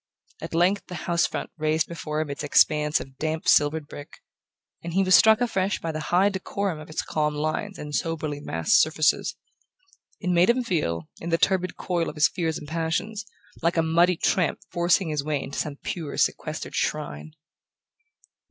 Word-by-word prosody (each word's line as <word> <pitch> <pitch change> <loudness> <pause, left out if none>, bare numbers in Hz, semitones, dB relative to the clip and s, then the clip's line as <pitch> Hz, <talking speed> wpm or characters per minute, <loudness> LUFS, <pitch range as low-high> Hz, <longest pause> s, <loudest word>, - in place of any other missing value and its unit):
At - - -5
length 185 +4 +2
the 180 - -7
house 170 0 +2
front - - -5
raised 155 +1 +1
before 155 -2 -3
him 150 -2 -4
its 140 - -5
expanse 150 +1 +3
of 135 0 -10
damp 160 0 -2
silvered 150 +1 +4
brick, 145 -1 -11 0.6
and 170 0 -5
he 195 - +4
was 185 0 +2
struck 220 +3 +7
afresh 195 -5 0
by 165 - -3
the 155 - -4
high 185 +3 +4
decorum 195 -3 -3
of 155 - -11
its 155 - -3
calm 150 -1 -1
lines 155 +7 -2
and 150 0 -7
soberly 155 -2 -2
massed 80 - +2
surfaces. 155 -1 +1 0.8
It 180 -3 -1
made 175 +3 +4
him 250 +1 +3
feel, 85 - -1
in 170 - -5
the 165 - +2
turbid 185 0 +1
coil 175 -3 -1
of - - -9
his 150 0 +5
fears 160 -3 -2
and 150 - -9
passions, 170 +7 -2 0.3
like 170 +1 +1
a 165 - +4
muddy 170 +3 +3
tramp 180 -4 +1
forcing 175 0 +2
his 150 -2 -1
way 150 -1 -1
into 140 - -5
some 150 -2 -3
pure 160 -5 -4
sequestered - - -1
shrine... 75 - -3
165 Hz, 180 wpm, -25 LUFS, 150-180 Hz, 0.8 s, struck